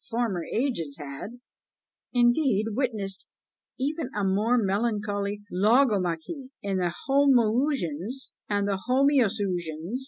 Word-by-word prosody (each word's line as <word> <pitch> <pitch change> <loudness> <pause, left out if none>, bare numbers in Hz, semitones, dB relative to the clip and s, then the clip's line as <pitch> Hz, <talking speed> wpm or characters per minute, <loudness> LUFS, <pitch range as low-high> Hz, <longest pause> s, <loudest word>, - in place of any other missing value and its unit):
Former 225 -7 -1
ages 220 - -1
had, 145 - -8 0.7
indeed, 240 -3 +3
witnessed 210 -6 -2 0.5
even 295 +1 -2
a 205 - 0
more 210 +6 +2
melancholy 205 -1 -1
logomachy, 215 - +1
in 195 -1 -1
the 175 -2 0 0.2
Homoousion 245 - +2 0.4
and 205 -1 +1
the 195 -1 -1
Homoiousion! 205 - +1
210 Hz, 95 wpm, -27 LUFS, 190-250 Hz, 0.7 s, indeed